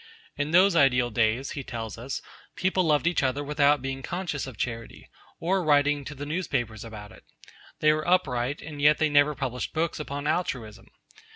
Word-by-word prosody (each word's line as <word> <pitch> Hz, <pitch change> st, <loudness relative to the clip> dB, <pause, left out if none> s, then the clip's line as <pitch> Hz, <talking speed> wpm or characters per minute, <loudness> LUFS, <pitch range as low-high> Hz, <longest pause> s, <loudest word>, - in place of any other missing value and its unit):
In 145 Hz, +1 st, -2 dB
those 180 Hz, +3 st, +5 dB
ideal 125 Hz, -5 st, +4 dB
days, 115 Hz, +4 st, +1 dB
he 140 Hz, -, -5 dB
tells 115 Hz, -4 st, -6 dB
us, 125 Hz, +4 st, -5 dB, 0.3 s
people 185 Hz, 0 st, +1 dB
loved 150 Hz, -3 st, +2 dB
each 175 Hz, -1 st, +2 dB
other 135 Hz, +2 st, 0 dB
without 145 Hz, -1 st, +2 dB
being 135 Hz, 0 st, -4 dB
conscious 170 Hz, -3 st, -3 dB
of 130 Hz, -5 st, -9 dB
charity, 115 Hz, 0 st, -5 dB, 0.3 s
or 185 Hz, +2 st, +1 dB
writing 145 Hz, -1 st, +3 dB
to 145 Hz, -, -7 dB
the 145 Hz, +1 st, -6 dB
newspapers 130 Hz, -, -2 dB
about 110 Hz, -2 st, -9 dB
it. -, -, -16 dB, 0.6 s
They 150 Hz, 0 st, +5 dB
were 155 Hz, +1 st, -3 dB
upright, 140 Hz, -7 st, +1 dB
and 150 Hz, -2 st, -7 dB
yet 150 Hz, +1 st, +5 dB
they 155 Hz, -1 st, +2 dB
never 145 Hz, 0 st, +4 dB
published 125 Hz, -2 st, -4 dB
books 165 Hz, 0 st, -1 dB
upon 145 Hz, -1 st, -5 dB
Altruism. 115 Hz, -9 st, -2 dB
145 Hz, 180 wpm, -27 LUFS, 125-155 Hz, 0.6 s, those